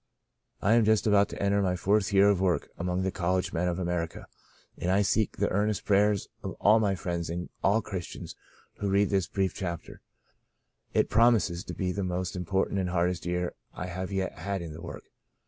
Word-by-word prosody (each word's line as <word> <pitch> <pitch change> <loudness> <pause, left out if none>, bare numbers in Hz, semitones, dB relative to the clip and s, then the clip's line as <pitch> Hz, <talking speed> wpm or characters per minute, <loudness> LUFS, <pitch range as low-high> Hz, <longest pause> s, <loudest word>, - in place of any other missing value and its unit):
I 105 - +4
am 115 0 +5
just 110 0 +3
about 100 -2 +4
to - - -7
enter 100 0 +2
on - - +1
my 90 -1 +1
fourth 100 +3 +1
year 100 0 +6
of 100 -2 +2
work 90 -3 +1
among 90 +1 -1
the 95 - 0
college 90 +1 -1
men 90 +1 0
of 85 -1 -1
America 85 -2 -3 0.5
and 90 - -3
I 100 +2 +3
seek 110 +1 +1
the - - +1
earnest 105 0 0
prayers 100 0 +3
of - - -5
all 110 +2 +5
my 100 -3 +1
friends 85 -2 -3
and 85 +1 -4
all 105 +3 +3
Christians 95 -4 -6 0.4
who 100 - -2
read 100 +1 +2
this 95 -4 +1
brief 95 0 -1
chap 85 -3 -4
ter. - - -13 0.9
It - - +3
promises 110 -6 +3
to - - -6
be 95 -1 -1
the 100 +2 -2
most 90 0 -2
important 95 +2 0
and 90 -1 -1
hardest 90 0 0
year 90 0 -1 0.2
I 90 - -4
have 90 +1 -5
yet 95 -1 -2
had 100 -2 -3
in 80 -2 -7
the 80 - -9
work. 85 - -8
95 Hz, 210 wpm, -28 LUFS, 90-100 Hz, 0.9 s, year